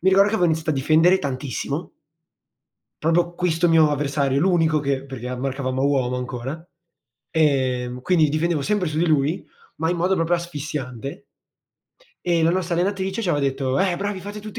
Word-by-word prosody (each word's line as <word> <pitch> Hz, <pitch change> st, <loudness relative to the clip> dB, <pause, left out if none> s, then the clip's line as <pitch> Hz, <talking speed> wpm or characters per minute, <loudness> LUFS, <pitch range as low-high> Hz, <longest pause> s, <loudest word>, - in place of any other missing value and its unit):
Mi 185 Hz, -, +2 dB
ricordo 195 Hz, +1 st, +6 dB
che 220 Hz, -, -1 dB
avevo 180 Hz, -4 st, +3 dB
iniziato 160 Hz, -1 st, 0 dB
a -, -, 0 dB
difendere 160 Hz, +7 st, +4 dB
tantissimo 140 Hz, +3 st, -4 dB, 1.1 s
proprio 170 Hz, +2 st, +2 dB
questo 175 Hz, -1 st, +1 dB
mio 160 Hz, -2 st, +5 dB
avversario, 140 Hz, -1 st, 0 dB
l'unico 165 Hz, -3 st, +3 dB
che 140 Hz, -1 st, -1 dB
perché 125 Hz, -2 st, -7 dB
a 125 Hz, -, -4 dB
marcavamo 130 Hz, 0 st, -2 dB
a 135 Hz, -, +2 dB
uomo 130 Hz, -3 st, +1 dB
ancora, 125 Hz, +4 st, -5 dB, 0.7 s
ehm, 130 Hz, -5 st, +1 dB
quindi 160 Hz, +1 st, +3 dB
difendevo 155 Hz, +1 st, 0 dB
sempre 195 Hz, +1 st, 0 dB
su 155 Hz, -, -3 dB
di 175 Hz, -, +2 dB
lui, 155 Hz, +3 st, +1 dB, 0.3 s
ma 160 Hz, +1 st, -1 dB
in 175 Hz, -, 0 dB
modo 180 Hz, +3 st, +1 dB
proprio 165 Hz, +1 st, +1 dB
asfissiante 145 Hz, -6 st, -5 dB, 1.0 s
e 170 Hz, -2 st, +2 dB
la 165 Hz, -, +4 dB
nostra 175 Hz, -1 st, -1 dB
allenatrice 190 Hz, +3 st, -1 dB
ci 195 Hz, -, -2 dB
aveva 145 Hz, -4 st, +1 dB
detto: 135 Hz, -1 st, 0 dB
"Eh 185 Hz, -2 st, +1 dB
bravi, 200 Hz, 0 st, -3 dB
fate 205 Hz, +3 st, -7 dB
tutti 210 Hz, -, -12 dB
155 Hz, 175 wpm, -22 LUFS, 135-175 Hz, 1.1 s, ricordo